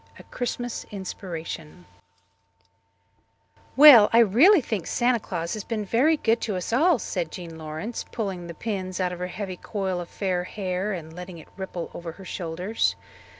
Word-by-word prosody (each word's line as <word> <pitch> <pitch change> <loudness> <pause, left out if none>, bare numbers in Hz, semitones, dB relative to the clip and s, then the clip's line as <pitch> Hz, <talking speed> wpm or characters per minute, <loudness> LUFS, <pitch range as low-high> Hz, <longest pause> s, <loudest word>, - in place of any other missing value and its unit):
A - - -12
Christmas 245 -1 -4
Inspiration 180 -4 -7 1.9
"Well, 265 -7 +10
I 230 - +4
really 245 - +6
think 215 - -3
Santa 240 0 +2
Claus 170 -5 -4
has 215 -2 -4
been 215 -3 -3
very 270 +10 +3
good 225 -4 +1
to 210 -4 -2
us 185 +5 -3
all," 320 +5 +4
said 175 -7 -3
Jean 170 -3 -8
Lawrence, 160 +9 -5
pulling 190 -6 -4
the 170 - -8
pins 185 -2 -4
out 180 -1 0
of 175 - -8
her 180 - -2
heavy 185 0 -5
coil 190 -3 -3
of 175 - -8
fair 185 -3 -1
hair 190 0 -3
and 160 -4 -6
letting 180 0 -8
it 160 - -13
ripple 190 -3 -6
over 170 -1 -7
her 190 +2 -13
shoulders. 175 - -1
190 Hz, 165 wpm, -25 LUFS, 175-225 Hz, 1.9 s, Well